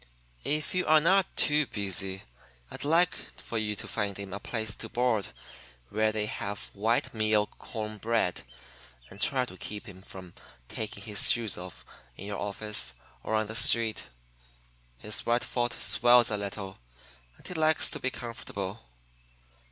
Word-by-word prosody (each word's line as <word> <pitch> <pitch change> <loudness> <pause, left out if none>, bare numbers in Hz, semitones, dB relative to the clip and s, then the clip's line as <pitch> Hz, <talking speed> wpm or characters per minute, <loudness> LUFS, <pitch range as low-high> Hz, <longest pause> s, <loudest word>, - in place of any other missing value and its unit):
"'If 150 -2 0
you 185 -1 0
are 155 0 +7
not 190 +4 +4
too 150 -1 +3
busy, 95 -2 0 0.5
I'd - - -3
like 165 +4 +4
for 115 - -6
you 105 -1 -1
to - - -5
find 100 -3 -2
him 100 -1 -6
a 100 - -4
place 110 -1 -1
to - - -4
board 120 -4 +1 0.6
where 110 +1 +2
they 110 -1 -1
have 105 -1 -5
white 110 +4 +1
meal 110 -1 +3
corn 110 -1 -6
bread, 110 -6 +1 0.7
and 100 - -9
try 130 -2 +3
to 95 - -11
keep 105 +2 -6
him 95 -2 -11
from 95 -2 -11 0.3
taking 100 - -5
his 105 -1 +4
shoes 115 -3 +1
off 90 0 -9 0.3
in 100 - -8
your 100 -1 -4
office 100 -10 -1 0.3
or 110 - -1
on 110 0 +2
the 110 - -6
street. 115 - +3 0.9
His 105 - -3
right 120 +1 +2
foot 120 -1 -1
swells 120 -1 +5
a 105 - +2
little, 100 -1 -6 0.6
and - - -12
he - - -5
likes 160 -2 +3
to - - -4
be 130 - 0
comfortable. 115 -5 -6
110 Hz, 160 wpm, -29 LUFS, 100-120 Hz, 0.9 s, are